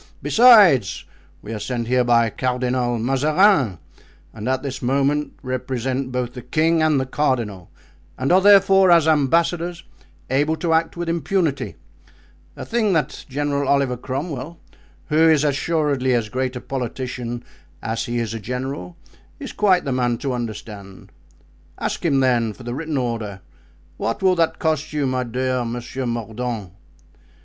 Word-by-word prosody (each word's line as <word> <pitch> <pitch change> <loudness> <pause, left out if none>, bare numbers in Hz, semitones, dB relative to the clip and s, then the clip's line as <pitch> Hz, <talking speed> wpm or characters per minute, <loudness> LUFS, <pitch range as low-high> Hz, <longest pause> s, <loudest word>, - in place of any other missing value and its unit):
Besides, 205 - +5 0.4
we 110 - -6
are 110 - -4
sent 120 +1 -3
here 125 +1 +2
by 115 -2 +3
Cardinal 125 -1 -1
Mazarin, 135 - +2 0.6
and 110 +2 -5
at 130 0 -1
this 135 -2 -5
moment 140 +3 0
represent 130 0 -3
both 125 -1 -3
the 125 - -8
king 160 +6 +1
and 155 -3 +3
the 130 - -1
cardinal, 120 - -2 0.5
and 130 +5 -1
are, 185 +2 +5
therefore, 195 -1 +6
as 170 -2 +5
ambassadors, 170 +3 +1 0.5
able 145 +4 +2
to 165 0 -1
act 165 +1 0
with 175 0 -3
impunity, 165 -2 -1 0.8
a - - -7
thing 225 -4 +1
that 150 -4 -2
General 140 0 -1
Oliver 140 -3 +2
Cromwell, 140 +4 -5 0.5
who 160 +1 +4
is 155 -2 +4
assuredly 145 -3 +1
as 115 -3 -1
great 130 +2 -2
a 125 - -5
politician 125 -2 -5 0.4
as 115 +1 -2
he 120 0 -3
is 115 -2 -2
a 115 - -4
general, 125 -6 -5 0.4
is - - -6
quite 190 -5 +2
the 135 - -2
man 120 -2 0
to 135 +1 -3
understand. 105 -4 -7 0.7
Ask - - -3
him 140 -5 +2
then, 120 -4 +1
for 125 - -14
the 120 0 -5
written 155 +2 -3
order. 115 -6 -3 0.6
What 115 - -3
will 185 -1 +4
that 165 -1 +1
cost 155 -2 -1
you 150 -2 0
my 130 -1 -1
dear 130 +1 -1
Monsieur 120 +2 -5
Mordaunt?" 115 -3 -4
130 Hz, 150 wpm, -21 LUFS, 120-155 Hz, 0.8 s, therefore